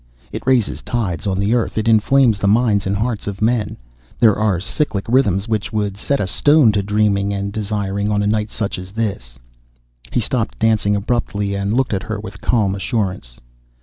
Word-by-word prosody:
"It - - -7
raises 125 -5 +2
tides 100 -7 -3
on 95 -1 0
the 100 +3 +1
Earth, 120 -2 0
it 110 +1 0
inflames 115 0 +4
the 100 - 0
minds 105 -2 +2
and 100 - 0
hearts 110 +1 -2
of 100 -1 -4
men. 110 -1 0 0.4
There 110 -4 +5
are 105 -4 +1
cyclic 100 - -2
rhythms 115 -5 +2
which 110 -2 -2
would 105 -3 -1
set 140 +7 -1
a - - 0
stone 145 +5 +4
to 105 -1 0
dreaming 100 -1 +1
and 100 0 -3
desiring 100 -1 -2
on 105 -1 +1
such 105 - 0
a - - +2
night 105 -2 -2
as - - -16
this." 95 - -4 0.7
He - - +1
stopped - - -2
dancing 105 - +2
abruptly 100 -2 -1
and 100 +2 -1
looked 130 -3 +1
at 95 - -1
her 110 +1 -4
with 95 -2 -9
calm 105 -5 +1
assurance. 95 - -3
105 Hz, 190 wpm, -19 LUFS, 100-115 Hz, 0.7 s, There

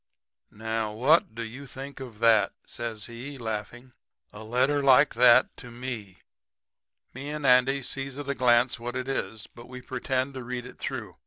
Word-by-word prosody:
"'Now, 110 0 -3
what 130 +1 +3
do 115 - -4
you 130 +5 -8
think 135 +1 -8
of 125 -5 -9
that?' 110 -3 +4
says 115 -3 -5
he, 125 +4 -8
laughing 120 +2 -5 0.4
'a 105 - -9
letter 130 +6 +1
like 140 +1 +5
that 120 0 +5
to 125 - -9
ME!' 120 -6 -6 1.0
"Me 135 +3 -7
and 150 -1 -4
Andy 130 +2 +4
sees 135 +1 -5
at 145 -1 -6
a 140 - 0
glance 120 -2 +3
what 120 +1 -5
it 130 0 -3
is; 110 -5 -3
but 120 +2 -14
we 125 0 -8
pretend 130 +1 -2
to 130 -1 -6
read 125 0 -5
it 125 - -12
through. 110 -10 -5
125 Hz, 175 wpm, -27 LUFS, 115-135 Hz, 1.0 s, like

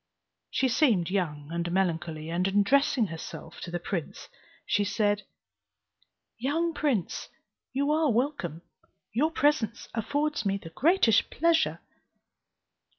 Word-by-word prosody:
She 265 - +1
seemed 230 - +2
young 150 -7 -2
and 170 0 -2
melancholy, 165 -4 -1
and 180 +2 +1
addressing 240 +6 +3
herself 165 -1 -8
to - - -6
the 175 - -2
prince, 170 -2 -5 0.4
she 205 - +2
said, 205 0 0 1.1
"Young 325 +7 0
prince, 265 - -1 0.4
you 280 +3 +1
are 310 -2 +3
welcome; 245 - -1 0.5
your 285 +8 +2
presence 290 -8 +1
affords 290 +4 -1
me 195 -1 0
the 165 -4 -11
greatest 280 - +3
pleasure." 335 0 +2
210 Hz, 115 wpm, -28 LUFS, 175-290 Hz, 1.1 s, addressing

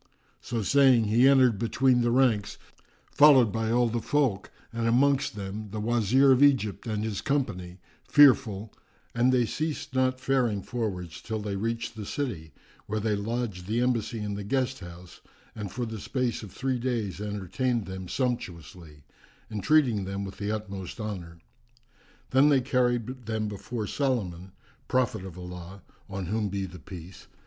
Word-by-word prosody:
So 115 -2 -3
saying, 130 -1 +5
he 115 +5 +4
entered 130 -6 +5
between 125 +2 +2
the 120 - +2
ranks, 120 -5 +2 0.5
followed 135 -6 +6
by 110 +1 -1
all 120 +1 +3
the 115 0 -2
folk 130 -10 0 0.2
and 115 0 -1
amongst 135 +1 +2
them 100 +1 -6
the 105 +2 -5
Wazir 120 +4 +3
of 130 0 +4
Egypt 130 -7 +3
and 105 -1 -2
his 110 -3 -3
company, 90 -11 -2 0.3
fearful: 120 -8 +5 0.4
and 120 +2 +3
they 125 -2 +3
ceased 155 +2 -4
not 130 0 +1
faring 125 -6 0
forwards 90 -7 -4
till 110 +2 -4
they 105 -1 -4
reached 115 +2 -3
the 105 -2 -7
city, 105 - -4 0.4
where 110 +1 -2
they 105 0 0
lodged 105 -3 -3
the 110 +3 0
embassy 120 -2 0
in 105 -1 -3
the 100 0 -5
guest 130 +4 -1
house 85 -1 -12 0.3
and 105 -4 -5
for 120 +4 -3
the 110 -1 -6
space 125 +2 -2
of 105 -4 -9
three 130 +3 -2
days 110 -7 -2
entertained 105 +3 -2
them 95 -1 -7
sumptuously, 85 - -4 0.5
entreating 110 -1 +2
them 100 +1 -4
with 95 - -9
the 105 0 -2
utmost 100 -3 -5
honour. 90 -6 -6 0.9
Then 135 +3 +5
they 140 -3 +4
carried 125 -1 -1
them 110 -1 -1
before 105 +2 -5
Solomon, 95 -9 -2 0.3
prophet 125 -7 0
of 95 -2 -9
Allah 90 +1 -9 0.3
(on 95 -1 -4
whom 105 +3 -1
be 100 0 -3
the 90 -1 -10
Peace!) 90 +1 -11
110 Hz, 160 wpm, -27 LUFS, 100-125 Hz, 0.9 s, followed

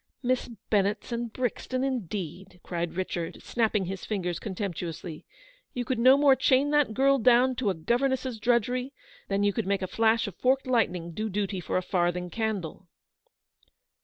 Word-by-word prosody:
Miss 255 0 0 0.2
Ben 200 -3 +4
nett's 210 +4 -3
and 235 -1 -3
Brixton, 255 +2 -2
indeed! 190 - -4
" - - -48
cried 170 -1 -3
Richard, 175 -2 -4
snapping 220 -4 0
his 190 +1 -5
fingers 180 -5 -2
contemptuously, 175 -5 -5 0.2
" - - -32
you 245 -1 -2
could 255 -2 -1
no 260 +3 +7
more 280 -2 +6
chain 270 +2 +3
that 295 -7 +2
girl 275 +1 +4
down 250 +2 +5
to 250 -5 +1
a 190 - 0
governess's 250 +6 0
drudgery, 250 +3 +1 0.3
than 200 0 0
you 205 0 +2
could 225 -2 -2
make 195 -1 0
a - - -1
flash 225 +3 +2
of 200 - -6
forked 260 +1 +2
lightning 180 -9 0
do 215 +6 -3
duty 200 -1 -2
for 180 - -2
a 185 - -1
farthing 180 -1 0
candle."' 200 -6 -3
215 Hz, 175 wpm, -28 LUFS, 185-255 Hz, 0.3 s, no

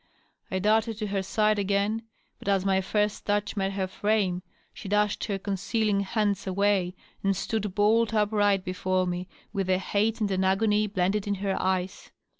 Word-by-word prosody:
I 190 - -1
darted 220 +3 +2
to 215 - -3
her 195 -1 0
side 215 +2 +1
again, 200 +2 0 0.4
but - - -12
as 195 -1 +2
my 190 -1 +3
first 210 +2 0
touch 205 +1 0
met 195 -1 -1
her 195 -1 -1
frame 190 -2 0 0.3
she 195 - -8
dashed 210 0 +1
her 200 -3 -2
concealing 200 +2 0
hands 200 -1 0
away 190 -1 +1 0.3
and 195 -1 +1
stood 210 -1 -2
bolt 220 +2 +3
upright 205 -2 +2
before 185 0 0
me 180 0 -3 0.3
with 195 -3 -1
a 185 - +4
hate 210 +4 0
and 210 -2 0
an 190 0 +1
agony 210 +2 +2
blended 195 +1 0
in 200 - 0
her 195 0 -1
eyes. 185 0 -2
200 Hz, 175 wpm, -27 LUFS, 190-210 Hz, 0.4 s, a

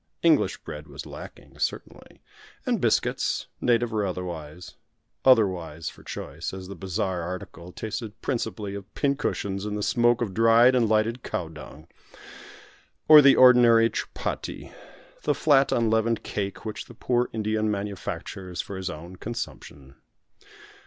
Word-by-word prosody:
English - - +3
bread - - -8
was - - -9
lacking, - - -11
certainly, - - -5 0.4
and 240 -7 0
biscuits, 115 - +1 0.2
native 120 -1 +2
or 105 -1 0
otherwise 90 -3 -6 0.5
"otherwise" 90 - +2
for - - -15
choice, 80 +6 -6
as 95 -1 -8
the 100 - -7
bazaar 95 0 -2
article 85 0 -7
tasted 110 +2 -6
principally 110 -5 -3
of 100 0 -8
pin 140 -1 +1
cushions 100 -8 -3
and 105 0 -3
the 105 - -3
smoke 120 +1 +3
of 100 -5 -4
dried 115 +4 +5
and 120 -4 +2
lighted 110 +3 +1
cow 85 - -3
dung 80 0 -12 1.2
or 155 -1 +10
the 140 -1 +7
ordinary 120 -3 +6
chupatti, - - -5 0.5
the 145 - +1
flat, 140 -3 +4
unleavened 115 0 +1
cake, 100 +2 -4
which 110 - -5
the 120 - -14
poor 125 +1 0
Indian 110 0 -1
manufactures 100 -2 -5
for 100 - -4
his 95 -1 -4
own 85 +4 -9
consumption. 70 - -7
105 Hz, 140 wpm, -26 LUFS, 95-120 Hz, 1.2 s, or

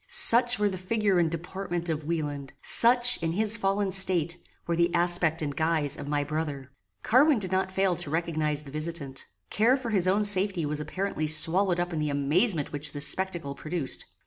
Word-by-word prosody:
Such 245 -11 +4
were 210 - +1
the 185 -2 -5
figure 200 0 0
and 165 -2 +1
deportment 175 +1 -5
of 155 -2 -2
Wieland! 145 -4 -4
Such, 245 -1 +5
in 165 0 -2
his 215 +3 +4
fallen 195 -1 -1
state, 175 -3 +3 0.3
were 170 - -2
the 170 +1 +1
aspect 170 -2 +1
and 145 -2 -4
guise 155 -2 -1
of 145 - -9
my 145 0 -1
brother! 145 -3 -5 0.3
Carwin 275 +4 +3
did 190 -4 -3
not 190 0 -1
fail 190 -1 0
to 145 - -2
recognize 155 -2 -2
the 140 - -12
visitant. 155 -3 -6 0.2
Care 235 +5 +2
for 245 -4 -6
his 190 -4 +1
own 200 +3 +1
safety 195 -4 +1
was 150 0 -3
apparently 155 +1 -4
swallowed 175 +4 +3
up 175 0 -3
in 160 - -3
the 150 -1 -2
amazement 150 - 0
which 145 0 -4
this 145 +1 -1
spectacle 175 -7 -2
produced. 155 0 -5
170 Hz, 190 wpm, -26 LUFS, 150-195 Hz, 0.3 s, Such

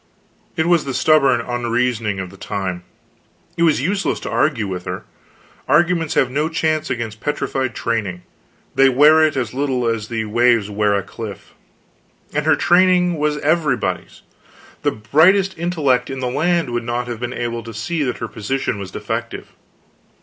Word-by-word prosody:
It 160 - +2
was 170 -2 +3
the 135 -2 -3
stubborn 135 -4 +4
unreasoning 120 -3 -1
of 95 -1 -5
the - - -13
time. 95 -2 -4 0.7
It 170 - -4
was 160 -5 +3
useless 195 +4 0
to - - -5
argue 125 -9 +1
with 90 -2 -5
her. 90 -1 -5 0.6
Arguments 165 +1 +2
have 125 - +2
no 150 +4 0
chance 160 -1 0
against 115 -4 -4
petrified 135 -4 -2
training; 105 -6 -2 0.5
they 135 0 +5
wear 150 +5 +6
it 155 -3 +1
as 120 -4 -2
little 130 -2 -1
as 115 -2 -1
the 110 -1 -3
waves 115 -1 +2
wear 105 0 +1
a 100 - -1
cliff. 105 +1 -9 0.8
And 150 +1 -1
her 160 - +5
training 180 -1 +3
was 150 0 0
everybody's. 155 -4 -1 0.6
The - - +2
brightest 180 - +3
intellect 150 -8 0
in 135 -1 -5
the 125 -1 -2
land 165 0 +1
would 120 0 -2
not 120 +1 -2
have 120 -2 -5
been 120 0 -4
able 120 -1 -3
to 115 0 -9
see 120 +10 -3
that 130 -3 -1
her - - -4
position 110 0 -3
was 95 -2 -6
defective. - - -5
125 Hz, 165 wpm, -19 LUFS, 115-155 Hz, 0.8 s, wear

